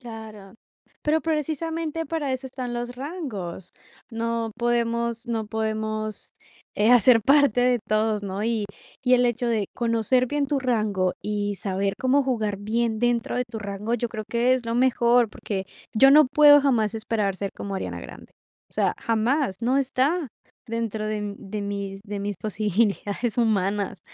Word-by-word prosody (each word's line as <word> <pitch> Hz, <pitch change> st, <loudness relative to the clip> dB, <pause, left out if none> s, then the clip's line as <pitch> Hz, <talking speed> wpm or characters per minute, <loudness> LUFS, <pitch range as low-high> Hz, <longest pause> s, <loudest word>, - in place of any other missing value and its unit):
Claro, 220 Hz, -5 st, -10 dB, 0.5 s
pero, 310 Hz, +1 st, +1 dB
precisamente, 325 Hz, +1 st, -2 dB
para 295 Hz, -3 st, -2 dB
eso 260 Hz, +1 st, -4 dB
están 250 Hz, -2 st, -5 dB
los 240 Hz, +1 st, -4 dB
rangos. 250 Hz, -, -6 dB, 0.4 s
No 230 Hz, 0 st, -2 dB
podemos 235 Hz, -1 st, 0 dB
no 225 Hz, -2 st, -2 dB
podemos, 215 Hz, 0 st, -2 dB, 0.4 s
eh, 210 Hz, +3 st, +3 dB
hacer 245 Hz, -1 st, +6 dB
parte 280 Hz, -2 st, +4 dB
de 250 Hz, -1 st, +3 dB
todos, 215 Hz, 0 st, +1 dB
¿no? 195 Hz, 0 st, -4 dB
Y 225 Hz, -2 st, 0 dB, 0.4 s
y 255 Hz, -1 st, +4 dB
el 250 Hz, 0 st, +4 dB
hecho 240 Hz, 0 st, 0 dB
de 220 Hz, -4 st, 0 dB
conocer 235 Hz, +2 st, +1 dB
bien 290 Hz, +2 st, -1 dB
tu 285 Hz, 0 st, 0 dB
rango 215 Hz, -8 st, 0 dB
y 205 Hz, -1 st, -2 dB
saber 195 Hz, 0 st, -1 dB
cómo 270 Hz, +2 st, +3 dB
jugar 220 Hz, -6 st, -1 dB
bien 220 Hz, +2 st, -1 dB
dentro 240 Hz, 0 st, 0 dB
de 250 Hz, -, 0 dB
tu 225 Hz, -, -5 dB
rango, 205 Hz, +2 st, -3 dB
yo 240 Hz, 0 st, -1 dB
creo 215 Hz, -2 st, -5 dB
que 240 Hz, +2 st, +2 dB
es 255 Hz, -2 st, -1 dB
lo 230 Hz, -, -1 dB
mejor, 240 Hz, -2 st, +3 dB
porque 195 Hz, -3 st, -4 dB, 0.3 s
yo 270 Hz, +5 st, +7 dB
no 300 Hz, +1 st, +7 dB
puedo 290 Hz, +2 st, +7 dB
jamás 230 Hz, -6 st, +1 dB
esperar 215 Hz, -3 st, -1 dB
ser 200 Hz, 0 st, -3 dB
como 200 Hz, -1 st, -5 dB
Ariana 190 Hz, -, -4 dB
Grande. -, -, -11 dB, 0.4 s
O -, -, -16 dB
sea, -, -, +1 dB
jamás, 230 Hz, 0 st, +1 dB
no 255 Hz, +4 st, +2 dB
está 275 Hz, +4 st, 0 dB, 0.4 s
dentro 225 Hz, -2 st, -2 dB
de 210 Hz, -1 st, -3 dB
de 205 Hz, +1 st, -5 dB
mis 200 Hz, -1 st, -4 dB
de 205 Hz, -1 st, -5 dB
mis 200 Hz, +1 st, -3 dB
posibilidades 210 Hz, +2 st, -1 dB
humanas. 205 Hz, -3 st, 0 dB
230 Hz, 160 wpm, -24 LUFS, 210-255 Hz, 0.5 s, yo